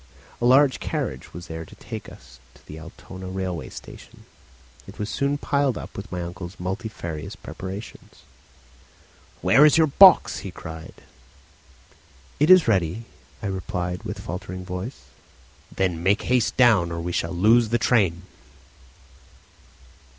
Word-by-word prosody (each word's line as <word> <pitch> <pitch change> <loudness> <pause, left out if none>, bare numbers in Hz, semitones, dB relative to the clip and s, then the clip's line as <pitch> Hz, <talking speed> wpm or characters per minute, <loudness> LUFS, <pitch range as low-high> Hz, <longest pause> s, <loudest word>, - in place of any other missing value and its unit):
A - - +1
large 130 +2 +5
carriage 65 -1 -4
was 85 +1 -9
there 80 0 -6
to - - -14
take - - -8
us 60 0 -16 0.2
to - - -21
the 75 - -9
Altona 95 +3 -10
railway 95 -2 -4
station. - - -12 0.6
It - - -12
was 105 +1 -4
soon 140 +1 0
piled 140 -3 0
up - - -9
with 100 0 -8
my 90 -1 -3
uncle's 85 +2 -8
multifarious 90 -4 -5
preparations. 95 +4 -9 1.2
"Where's 150 +3 +6
your 160 - +6
box?" 185 +6 +6
he 100 - -7
cried. 80 -2 -9 1.4
"It 150 - +3
is 185 -5 +8
ready," 95 +1 +1 0.4
I - - -3
replied, 90 -2 -3
with - - -6
faltering 90 +2 -6
voice. 90 +7 -6 0.7
"Then 90 -4 -1
make 100 +4 +2
haste 125 -2 +1
down, 110 -9 +5
or 85 - -3
we 85 +1 -3
shall 80 - -1
lose 110 +6 +4
the 120 - +2
train." 95 -8 +2
95 Hz, 135 wpm, -24 LUFS, 85-120 Hz, 1.4 s, is